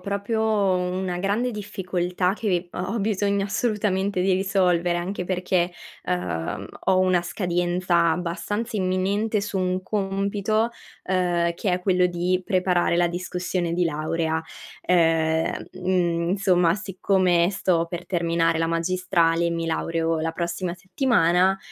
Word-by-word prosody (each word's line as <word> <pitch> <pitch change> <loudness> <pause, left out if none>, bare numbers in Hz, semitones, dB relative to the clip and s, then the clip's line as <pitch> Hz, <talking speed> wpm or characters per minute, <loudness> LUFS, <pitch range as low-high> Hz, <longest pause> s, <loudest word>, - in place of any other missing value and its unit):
proprio 200 +3 -2
una 185 -4 0
grande 205 +6 0
difficoltà 185 -4 -2
che 220 -1 -3
vi 175 -1 0
ho - - -4
ho 230 - -1
bisogno 200 -1 0
assolutamente 200 -3 0
di 190 +1 +2
risolvere, 185 -2 +2
anche 180 +1 -3
perché, 180 -1 0 0.3
uhm, 90 +2 -3 0.2
ho 185 - +3
una 185 -1 +3
scadenza 175 -1 +1
abbastanza 190 +7 -3
imminente 200 +3 0
su 205 0 -4
un 185 0 -1
compito, 200 +3 0 0.4
uhm, 175 -2 +1
che 190 +3 -1
è 180 - 0
quello 180 -1 +3
di 180 +1 -1
preparare 180 -2 +1
la 175 0 +3
discussione 180 0 -3
di 175 +1 +1
laurea. 160 +1 -1 0.5
Uhm, 165 -2 +2
mhmm, 175 -2 0
insomma, 180 -4 +3
siccome 185 -3 +1
sto 180 -4 +1
per 175 0 -5
terminare 165 -2 +1
la 165 - +1
magistrale 170 0 +1
e - - 0
mi 165 0 -2
laureo 165 0 -1
la 165 +1 -1
prossima 170 +1 -3
settimana, 185 -2 +2
180 Hz, 135 wpm, -24 LUFS, 170-195 Hz, 0.5 s, ho